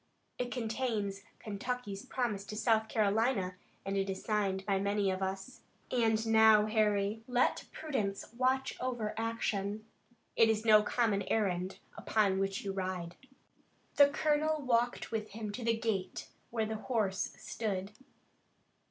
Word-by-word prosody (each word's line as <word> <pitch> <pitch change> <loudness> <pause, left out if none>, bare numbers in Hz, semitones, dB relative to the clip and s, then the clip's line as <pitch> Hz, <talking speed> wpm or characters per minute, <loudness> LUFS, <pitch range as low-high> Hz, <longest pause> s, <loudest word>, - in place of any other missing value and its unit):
It 245 - -1
contains 220 -4 -2 0.2
Kentucky's 210 -1 -4
promise 235 -7 -1
to 210 - -7
South 220 0 +2
Carolina, 210 -2 +1 0.3
and 195 0 -2
it 195 0 0
is 190 0 -4
signed 195 -3 0
by 195 -2 +1
many 200 0 +1
of 185 0 -3
us. 190 +6 -4 0.3
And 225 -3 +2
now, 220 -1 +6
Harry, 215 -1 +1
let 250 0 +1
prudence 220 -10 -3
watch 260 +2 +1
over 240 -4 -2
action. 215 -2 -2 0.5
It 225 -1 +5
is 220 0 0
no 215 -1 +7
common 210 -2 +1
errand 190 -4 0 0.2
upon 200 -3 +1
which 195 0 -1
you 195 - -2
ride." 185 -2 -3 0.8
The 285 -1 +8
colonel 305 +1 +1
walked 245 -1 +1
with 215 -2 -3
him 215 -1 -4
to 240 +4 -6
the 230 0 +2
gate 215 -5 -2 0.2
where 225 -2 -1
the 220 0 -3
horse 210 -5 -1
stood. 200 -3 -3
215 Hz, 140 wpm, -33 LUFS, 195-235 Hz, 0.8 s, The